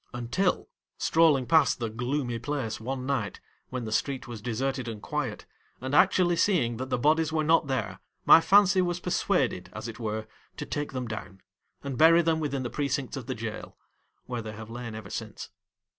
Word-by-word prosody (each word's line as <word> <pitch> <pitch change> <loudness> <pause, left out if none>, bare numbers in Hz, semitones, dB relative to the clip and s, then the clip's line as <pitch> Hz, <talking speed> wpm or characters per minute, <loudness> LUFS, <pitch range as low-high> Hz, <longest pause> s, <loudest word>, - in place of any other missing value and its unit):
Until, 120 +11 0 0.3
strolling 155 -5 +3
past 150 +3 +4
the 115 - -2
gloomy 120 +1 -2
place 130 -3 -3
one 130 +3 -4
night, 130 -7 -2 0.3
when 125 -2 -4
the 110 - -5
street 130 +4 -1
was 115 -3 -7
deserted 130 +2 -2
and 110 -2 -5
quiet, 130 -2 -4 0.3
and 130 +2 -5
actually 175 +1 +4
seeing 155 - +2
that 130 +2 -5
the - - +1
bodies 155 +5 +2
were 155 -1 +1
not 160 0 +3
there, 130 -1 -2 0.3
my 165 - +9
fancy 195 0 +5
was 175 -1 -1
persuaded, 180 0 0
as - - -6
it 115 +1 -8
were, 110 -1 -3 0.3
to - - -4
take 145 -2 -4
them 125 -2 -3
down 105 -3 -7 0.4
and 135 -3 -4
bury 165 +2 +7
them 160 -1 +1
within 140 -4 -2
the 120 - -4
precincts 140 0 -2
of 130 -4 -7
the 130 - -3
jail, 110 -1 -6 0.5
where 125 -2 -4
they 110 -1 -7
have 110 +1 -9
lain 120 -2 -6
ever 110 -3 -8
since. 110 -2 -6
130 Hz, 190 wpm, -28 LUFS, 115-155 Hz, 0.5 s, my